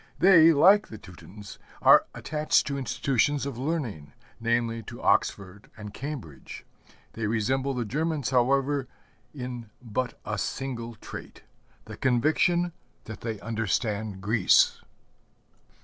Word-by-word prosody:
They, 170 -3 +7
like 190 +8 +5
the 110 - -9
Teutons, 95 -1 -12 0.2
are - - +6
attached 150 0 +1
to 140 - -3
institutions 135 +1 0
of 135 -4 -5
learning, 125 - -4 0.3
namely, 115 0 0
to - - -10
Oxford 100 +1 0
and 105 -1 -9
Cambridge. 125 - -8 0.5
They 115 -2 -3
resemble 130 +5 0
the 120 -2 -2
Germans, 150 +3 -2
however, 135 +2 +1 0.4
in 125 -5 -7
but 120 +1 -4
a 105 0 -3
single 120 +2 -4
trait - - -10 0.4
the - - -10
conviction 160 +7 +1 0.3
that 110 - -9
they 110 -3 -4
understand 110 -2 -2
Greece. 105 -1 +3
120 Hz, 115 wpm, -27 LUFS, 110-140 Hz, 0.5 s, They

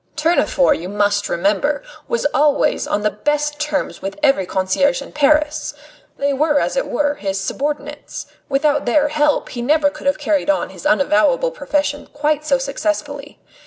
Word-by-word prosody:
Tournefort, 330 - +2
you 175 +2 -6
must 205 0 0
remember, 210 - 0 0.2
was 475 - -1
always 290 +1 +2
on 205 - -1
the 210 - +2
best 295 +5 -1
terms 300 -1 -2
with 195 +6 -5
every 270 -11 +3
concierge 190 +10 +1
in 275 - -9
Paris. 300 0 +1 0.4
They 280 0 0
were, 295 +1 +2
as - - -1
it - - 0
were, 290 -1 0
his 195 -7 -3
subordinates; 290 +7 -4 0.2
without 290 0 +1
their 295 +4 +3
help 295 0 +1
he 240 - -5
never 290 +3 +2
could 300 -1 -7
have 280 +2 +2
carried 300 0 0
on 300 - +1
his - - -4
unavowable 300 - +3
profession 295 -11 -2
quite 300 +1 0
so 285 -3 +2
successfully. 285 +1 -3
290 Hz, 160 wpm, -19 LUFS, 265-300 Hz, 0.4 s, every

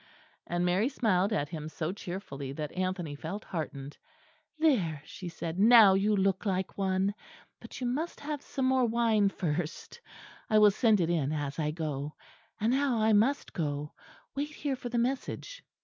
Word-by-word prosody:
And 175 +1 0
Mary 185 +8 +2
smiled 205 -7 +1
at 145 -9 0
him 155 -2 -5
so 160 +1 -3
cheerfully, 175 -8 -6
that 150 0 -5
Anthony 185 -4 -2
felt 165 +8 -6
heartened. 145 -5 -5 0.6
"There," 195 - +2
she 200 -4 -7
said, 165 +1 -5
"now 220 -2 +8
you 205 +2 +2
look 195 -1 +1
like 190 -2 -1
one. 190 0 +1 0.5
But - - -10
you 255 - -3
must 290 +8 -2
have 295 -1 -4
some 270 -2 -3
more 260 -1 +3
wine 225 -3 +3
first, 175 - -4 0.5
I 215 - +4
will 210 -1 +7
send 215 -1 +3
it 170 0 +1
in 150 -4 0
as 145 -1 -3
I 150 -1 0
go. 150 -2 -4 0.4
And 220 +3 +2
now 270 -3 +2
I 220 0 +3
must 235 +8 +2
go. 150 -3 -3 0.4
Wait 285 +2 -2
here 290 -2 -3
for 245 -1 -6
the 240 - -2
message." 265 - -2
195 Hz, 170 wpm, -30 LUFS, 160-235 Hz, 0.6 s, now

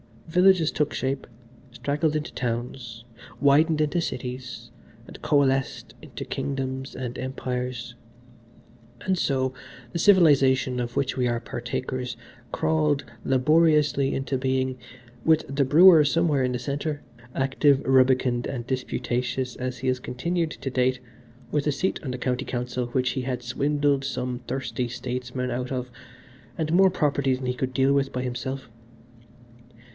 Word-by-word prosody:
Villages 180 -1 +4
took 150 0 -1
shape, 135 +1 -2 0.4
straggled 150 +5 -1
into 150 -1 -3
towns, 120 -1 -4 0.4
widened 150 +2 +4
into 150 +3 +1
cities 125 -3 -6 0.3
and - - -12
coalesced 135 -2 +1
into - - -8
kingdoms 130 -1 -4
and 125 -1 -5
empires: 125 -2 -4 1.1
and 185 -1 0
so, 130 -4 0 0.4
the 170 - -3
civilisation 135 -9 +4
of 120 0 -4
which 140 - 0
we 125 -1 +1
are 120 -1 -1
partakers 125 +1 -4 0.4
crawled 155 -3 +1 0.2
laboriously 150 0 +3
into 135 0 -1
being, 130 0 -1 0.5
with 160 -1 +4
the 140 0 +2
brewer 160 +3 +8
somewhere 150 -2 +2
in 125 - -1
the 125 - -2
centre, 145 +3 -3 0.3
active, 135 +1 +2
rubicund 130 -2 +3
and 120 -3 -4
disputatious, 125 0 -2
as 130 0 -4
he 130 - -3
has 130 0 0
continued 165 +7 -2
to 140 - -5
date, 130 0 +1 0.5
with 150 0 0
a 150 - +2
seat 185 +8 -1
on 140 - -4
the 125 - -4
County 125 0 -2
Council 125 0 -3
which 125 0 0
he 130 -1 -3
had 125 -1 -3
swindled 140 +2 0
some 125 -2 -3
thirsty 125 -2 -2
statesman 125 +1 -4
out 125 +2 -3
of, 125 -1 -4 0.7
and 160 -1 -1
more 190 +2 +6
property 140 -6 +1
than 130 0 -6
he 125 - +1
could 130 0 -3
deal 135 +1 +3
with 140 -1 0
by 125 - -2
himself. 125 +1 -4
130 Hz, 140 wpm, -25 LUFS, 125-145 Hz, 1.1 s, brewer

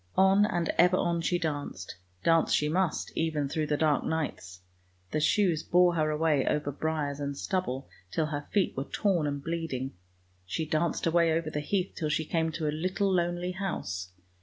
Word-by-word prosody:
On 195 +2 +5
and 175 -4 -1
ever 180 +2 +6
on 170 -2 0
she 175 +2 +1
danced; 145 - -4 0.3
dance 165 -1 +3
she 150 - +3
must 175 +2 -1
even 155 -3 0
through 155 +2 -1
the 150 - +1
dark 155 -2 +2
nights. 95 - -3 0.5
The - - 0
shoes 175 -1 +2
bore 180 0 +4
her 155 -2 +1
away 150 -2 +2
over 150 -1 0
briars 145 -1 -2
and 140 -1 -3
stubble 140 -10 -2 0.2
till 160 - 0
her 145 -1 -4
feet 200 -3 +1
were 135 - -2
torn 180 -6 +1
and 140 -1 -3
bleeding; 160 -6 -3 0.5
she 95 - -3
danced 155 +2 0
away 165 0 +3
over 160 -1 0
the 150 - -2
heath 185 +5 -1
till 155 -3 -2
she 155 +1 0
came 160 0 0
to 155 -2 -2
a 150 - 0
little 185 +4 0
lonely 175 0 0
house. 90 - -4
160 Hz, 185 wpm, -29 LUFS, 145-175 Hz, 0.5 s, ever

